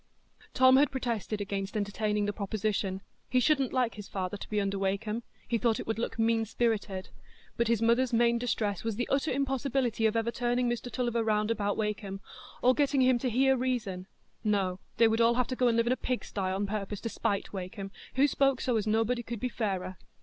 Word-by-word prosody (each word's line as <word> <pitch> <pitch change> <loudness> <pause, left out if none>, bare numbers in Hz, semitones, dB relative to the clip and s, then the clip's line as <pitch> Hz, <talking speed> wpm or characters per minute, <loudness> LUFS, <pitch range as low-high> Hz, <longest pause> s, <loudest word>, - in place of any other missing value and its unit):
Tom 260 0 +7
had 285 0 +5
protested 230 -5 -2
against 200 +1 -3
entertaining 210 0 0
the 205 - -1
proposition. 200 -2 -2 0.3
He 255 - +3
shouldn't 270 0 +2
like 250 -3 +1
his 205 -1 -9
father 185 0 -3
to 200 - -8
be 210 - 0
under 200 -1 -1
Wakem; 200 +4 -1 0.3
he 235 -1 0
thought 230 -2 +1
it - - -5
would 225 0 -2
look 235 - -3
mean 225 0 +2
spirited; 215 -4 -1 0.5
but 235 - +1
his 230 -1 +2
mother's 240 +2 +3
main 235 0 +3
distress 215 -5 -1
was 225 -2 -2
the 240 +3 -2
utter 280 +3 +1
impossibility 265 -4 0
of 220 - -1
ever 230 +1 +1
"turning 245 +1 0
Mr 240 +1 -3
Tulliver 240 -1 0
round 215 0 +1
about 205 -3 -1
Wakem," 210 -2 -3 0.4
or 250 +1 +6
getting 280 -1 +2
him 255 -1 +4
to 255 - -1
hear 265 +3 +3
reason; 235 -8 -2 0.4
no, 195 -4 0 0.2
they 230 - +6
would 225 +1 +2
all 230 +1 +4
have 250 0 +2
to 255 - -2
go 250 0 +2
and 230 -1 +2
live 230 - +3
in 240 - +3
a - - 0
pigsty 250 -6 -3
on 195 +2 -1
purpose 205 0 -3
to 230 - -3
spite 200 -2 -2
Wakem, 195 +1 -6 0.2
who 270 +2 +5
spoke 275 -2 +2
"so 250 -3 +1
as 215 0 -1
nobody 225 +3 +1
could 235 -1 -6
be 250 - -1
fairer." 190 -6 -3
225 Hz, 210 wpm, -30 LUFS, 205-245 Hz, 0.5 s, Tom